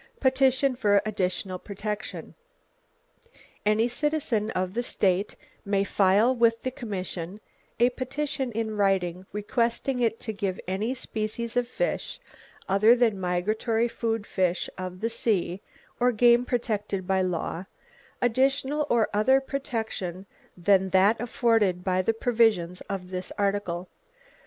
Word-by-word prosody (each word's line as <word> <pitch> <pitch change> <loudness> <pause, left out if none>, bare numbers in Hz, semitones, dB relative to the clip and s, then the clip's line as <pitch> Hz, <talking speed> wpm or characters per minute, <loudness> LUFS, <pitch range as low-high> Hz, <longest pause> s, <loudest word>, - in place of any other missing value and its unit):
Petition 265 0 +3
for 205 -4 +3
additional 185 -2 -2
protection. 210 +2 -5 1.3
Any 215 +2 +3
citizen 245 -5 0
of 185 -2 -2
the 240 - 0
state 195 -4 0 0.3
may 200 -1 +1
file 200 +6 +3
with 230 -1 +2
the 255 - -1
commission 190 -6 -5 0.4
a 240 +1 +4
petition 265 +1 -3
in 220 0 -2
writing 190 -2 0
requesting 235 +5 0
it 230 -2 +1
to 220 - -3
give 195 -3 -3
any 210 +7 -1
species 225 -1 -3
of 245 -1 +1
fish, - - -3 0.5
other 215 +5 +5
than 230 -5 +2
migratory 215 +6 0
food 225 -2 -2
fish 185 -2 -1
of 185 -1 -6
the 230 - 0
sea, 195 -5 0 0.4
or 250 0 +4
game 240 +1 +4
protected 210 -6 -2
by 190 0 +1
law, 180 0 -2 0.6
additional 270 +4 +1
or 230 -2 +3
other 255 +6 +4
protection 220 -9 -4 0.3
than 190 +1 +3
that 195 +4 +4
afforded 225 -6 +1
by 185 0 +1
the 205 - +2
provisions 220 -7 +2
of 185 -2 -5
this 185 0 -4
article. 195 -3 -1
215 Hz, 130 wpm, -26 LUFS, 190-240 Hz, 1.3 s, other